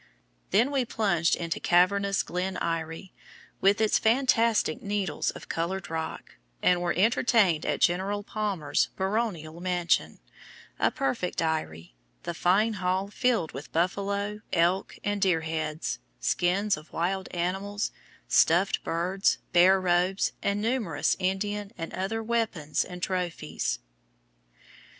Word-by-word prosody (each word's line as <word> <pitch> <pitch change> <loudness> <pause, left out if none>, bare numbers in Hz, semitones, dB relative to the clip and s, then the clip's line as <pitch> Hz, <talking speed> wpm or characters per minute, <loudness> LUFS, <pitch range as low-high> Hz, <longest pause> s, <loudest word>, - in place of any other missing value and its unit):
Then 230 +8 +3
we 275 -2 +1
plunged 195 -8 +1
into 165 -1 -3
cavernous 200 +3 +3
Glen 185 +2 -3
Eyrie, 165 +2 -3 0.5
with 200 +1 +4
its 220 -1 +3
fantastic 230 - +2
needles 200 -4 -1
of - - -8
colored 175 +2 -3
rock, 160 0 -5 0.2
and 180 -1 +3
were 175 -1 0
entertained 205 -4 +3
at - - -1
General 195 +4 +1
Palmer's 200 -8 -1
"baronial 190 -6 -2
mansion," 180 -2 0 0.6
a - - +4
perfect 255 -10 -2
eyrie, 90 - -2 0.3
the 170 - -3
fine 195 +6 +2
hall 185 +2 0
filled 230 -7 +1
with 140 +2 -9
buffalo, 200 +4 -1
elk, 175 +3 +1
and 205 -1 -1
deer 180 -4 +3
heads, 160 0 -3 0.2
skins 185 - +1
of 155 +1 -13
wild 190 +3 -1
animals, 195 +4 -2 0.4
stuffed 175 +4 +3
birds, 180 +4 +1 0.2
bear 185 +2 +6
robes, 180 +1 +1
and 200 +1 0
numerous 225 - 0
Indian 200 +2 -2
and 165 -1 -6
other 215 +4 -2
weapons 220 -10 0
and 180 -1 -9
trophies. 170 - -2
185 Hz, 120 wpm, -27 LUFS, 170-205 Hz, 0.6 s, bear